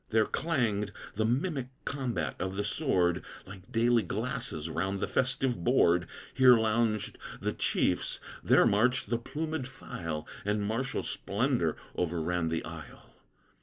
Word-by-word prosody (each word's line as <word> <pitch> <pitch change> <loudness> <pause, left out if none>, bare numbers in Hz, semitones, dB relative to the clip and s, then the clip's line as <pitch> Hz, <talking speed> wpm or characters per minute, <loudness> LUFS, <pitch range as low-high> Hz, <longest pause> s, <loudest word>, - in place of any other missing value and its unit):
There 110 -1 +4
clanged 115 - 0 0.2
the 110 +2 0
mimic 135 +2 0 0.2
combat 130 -4 -2
of 95 +1 -2
the 105 - -1
sword, 95 - +1 0.2
Like 95 +4 -12
daily 120 0 +4
glasses 110 - -3
round 95 +4 -1
the - - -1
festive 125 -6 0
board; 90 -8 +4 0.3
Here 130 -2 +7
lounged 110 -1 0 0.2
the - - -1
chiefs, - - 0 0.2
there - - +6
marched 115 +2 +2
the 115 - +2
plumèd 155 +2 -3
file, 80 - -6 0.2
And 105 0 0
martial 115 +5 -1
splendor - - 0 0.2
over 85 -1 -1
ran 85 0 0
the 80 0 -2
isle. - - -10
110 Hz, 135 wpm, -30 LUFS, 95-125 Hz, 0.3 s, Here